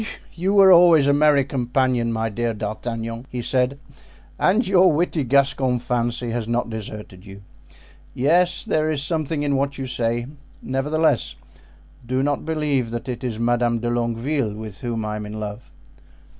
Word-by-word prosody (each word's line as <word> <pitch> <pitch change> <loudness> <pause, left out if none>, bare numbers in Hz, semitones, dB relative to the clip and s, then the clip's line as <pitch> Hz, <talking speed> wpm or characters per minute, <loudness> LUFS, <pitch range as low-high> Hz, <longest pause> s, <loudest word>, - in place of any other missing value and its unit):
"You 190 +4 -1
were 195 -1 +7
always 170 -4 +7
a 140 - +4
merry 145 -2 +4
companion, 125 -2 0
my 110 0 -1
dear 115 +1 -2
D'Artagnan," 115 +3 -5
he 125 -1 -5
said, 130 +2 0 0.6
"and 215 +6 +2
your 185 -1 +5
witty 155 -1 0
Gascon 135 -1 +2
fancy 120 0 -2
has 115 -1 -3
not 120 0 -1
deserted 105 -4 -8
you. 100 -1 -12 0.7
Yes, 175 +7 +2
there 155 0 +1
is 145 -3 -1
something 155 -1 -2
in 140 -1 +1
what 140 +1 -1
you 135 - -4
say; 120 -1 -1 0.3
nevertheless, 145 +1 0 0.7
do 130 +2 -1
not 145 0 -1
believe 150 -6 -1
that 120 +2 -5
it 125 0 -5
is 120 -4 -3
Madame 120 0 +1
de 120 +1 -2
Longueville 120 0 -1
with 110 -2 -8
whom 115 -3 -3
I 105 0 -3
am 105 - -6
in 105 +1 -7
love." 105 +2 -7
125 Hz, 160 wpm, -22 LUFS, 115-145 Hz, 0.7 s, were